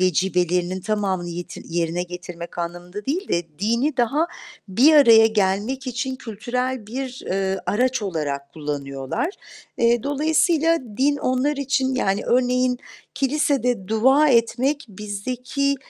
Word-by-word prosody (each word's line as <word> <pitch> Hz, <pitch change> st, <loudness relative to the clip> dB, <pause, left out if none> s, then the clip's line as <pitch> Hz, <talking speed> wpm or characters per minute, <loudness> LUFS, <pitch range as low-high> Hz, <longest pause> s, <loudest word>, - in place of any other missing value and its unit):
vecibelerinin 180 Hz, 0 st, +1 dB
tamamını 195 Hz, -4 st, -1 dB
yet 175 Hz, +1 st, -7 dB
yerine 170 Hz, +1 st, -1 dB
getirmek 175 Hz, -1 st, -8 dB
anlamında 175 Hz, +4 st, -5 dB
değil 350 Hz, +8 st, -2 dB
de 170 Hz, 0 st, 0 dB
dini 235 Hz, +8 st, 0 dB
daha 275 Hz, +7 st, +2 dB, 0.4 s
bir 250 Hz, +12 st, +5 dB
araya 230 Hz, -6 st, +8 dB
gelmek 215 Hz, +5 st, 0 dB
için 260 Hz, +1 st, -3 dB
kültürel 250 Hz, +1 st, -3 dB
bir, 255 Hz, +3 st, -5 dB
eee, 190 Hz, 0 st, -1 dB
araç 255 Hz, +2 st, +1 dB
olarak 145 Hz, -7 st, -3 dB
kullanıyorlar. 140 Hz, -, -3 dB, 0.5 s
Eee, 235 Hz, -1 st, +3 dB
dolayısıyla 320 Hz, +3 st, +2 dB, 0.2 s
din 285 Hz, +2 st, +3 dB
onlar 265 Hz, +3 st, 0 dB
için, 265 Hz, -1 st, 0 dB
yani, 195 Hz, -5 st, 0 dB
örneğin 250 Hz, 0 st, +2 dB, 0.4 s
kilisede 270 Hz, -7 st, 0 dB
dua 265 Hz, +7 st, +4 dB
etmek, 260 Hz, +4 st, +2 dB
bizdeki, 250 Hz, +8 st, -2 dB
235 Hz, 115 wpm, -22 LUFS, 185-265 Hz, 0.5 s, araya